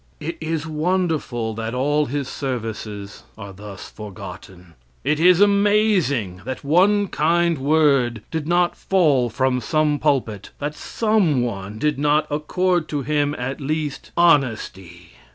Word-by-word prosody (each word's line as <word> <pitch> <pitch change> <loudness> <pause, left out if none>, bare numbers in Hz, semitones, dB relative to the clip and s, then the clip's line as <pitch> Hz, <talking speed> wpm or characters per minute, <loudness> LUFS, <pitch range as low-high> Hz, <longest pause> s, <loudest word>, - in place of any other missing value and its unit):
It 165 +2 -5
is 160 -1 -2
wonderful 155 -8 -1
that 115 +2 -4
all 145 +3 +1
his 140 0 -3
services 110 -7 -5 0.2
are 100 -2 -9
thus 100 0 -10
forgotten. 90 -3 -10 0.3
It 150 - +1
is 180 +1 +5
amazing 200 - +2
that 130 +1 -6
one 190 +8 +3
kind 170 0 +1
word 135 -6 +2
did 160 -2 -3
not 175 +1 +2
fall 150 -10 +2
from 130 +1 0
some 150 +3 +1
pulpit; 120 -9 -1
that 145 +1 -3
some 190 - +1
one 105 -3 -5
did 150 +3 0
not 150 +1 +2
accord 175 +3 0
to 145 -2 -2
him, 145 0 0
at 130 +4 -4
least 150 0 -3
honesty. 110 - +1
145 Hz, 135 wpm, -21 LUFS, 115-165 Hz, 0.3 s, is